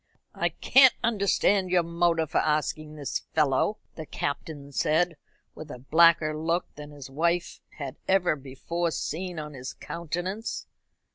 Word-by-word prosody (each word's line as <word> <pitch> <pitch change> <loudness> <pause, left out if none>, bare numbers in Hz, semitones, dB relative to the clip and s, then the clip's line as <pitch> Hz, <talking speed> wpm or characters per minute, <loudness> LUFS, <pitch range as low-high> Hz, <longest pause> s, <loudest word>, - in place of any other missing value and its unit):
"I - - 0
can't 265 -1 +5
understand 200 -3 +2
your 180 -1 +3
motive 170 -2 +1
for - - +3
asking 155 0 -1
this 145 -3 -3
fellow," 155 +7 +1 0.2
the 160 -2 -8
Captain 145 0 -4
said, 165 +4 +1 0.4
with 155 - -10
a 135 - -7
blacker 160 +3 +4
look 165 +3 -1
than 150 0 -10
his 140 -2 -11
wife 170 +4 0 0.2
had 140 -1 -6
ever 190 -4 +3
before 145 +5 -3
seen 175 +3 -4
on 150 -1 -6
his 130 -2 -7
countenance. 175 +6 -4
160 Hz, 140 wpm, -27 LUFS, 150-175 Hz, 0.4 s, can't